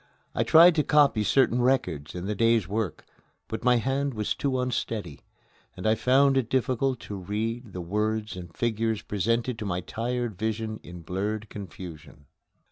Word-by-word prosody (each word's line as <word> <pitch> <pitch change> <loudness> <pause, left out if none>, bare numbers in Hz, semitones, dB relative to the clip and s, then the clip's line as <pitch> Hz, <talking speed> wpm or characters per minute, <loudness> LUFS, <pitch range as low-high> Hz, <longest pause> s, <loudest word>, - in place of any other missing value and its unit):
I - - 0
tried 170 +2 +7
to 150 - +4
copy 140 -8 +4
certain 125 +1 +3
records 90 - 0
in 90 +1 -4
the 105 - -1
day's 115 -2 +2
work, 105 -3 -3 0.4
but 110 - -5
my 125 0 +5
hand 135 +3 0
was 105 -1 -1
too 135 -2 -1
unsteady, 110 - -3 0.6
and 90 - -7
I 110 - +5
found 135 +4 +4
it 120 -4 0
difficult 130 0 0
to 105 - -7
read 110 +5 -3
the 90 - -4
words 105 +4 -1
and 90 -2 -8
figures 115 0 -1
presented 115 +4 -1
to 105 - -4
my 90 -2 -1
tired 120 +1 -3
vision 110 0 -2
in 90 0 -10
blurred 105 +5 -3
confusion. 85 -7 -10
110 Hz, 165 wpm, -27 LUFS, 100-125 Hz, 0.6 s, tried